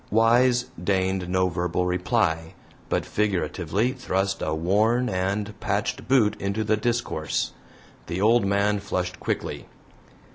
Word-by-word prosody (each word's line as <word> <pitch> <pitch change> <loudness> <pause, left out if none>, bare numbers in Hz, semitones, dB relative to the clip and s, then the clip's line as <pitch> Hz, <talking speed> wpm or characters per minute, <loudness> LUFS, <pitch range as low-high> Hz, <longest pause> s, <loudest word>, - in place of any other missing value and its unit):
Wise 120 +3 +4 0.2
deigned 95 -1 0
no 95 0 +2
verbal 90 0 -1
reply, 90 -3 0 0.3
but - - 0
figuratively 100 +2 0
thrust 95 -6 -1
a - - -1
worn 105 +9 +2
and 100 +3 -1
patched - - -2
boot 115 -6 +4
into 100 +3 -1
the 110 0 +2
discourse. 110 -9 -1 0.6
The 85 +2 -3
old 115 +3 +4
man 100 +1 +1
flushed 90 -2 -3
quickly. - - -3
100 Hz, 120 wpm, -25 LUFS, 90-110 Hz, 0.6 s, Wise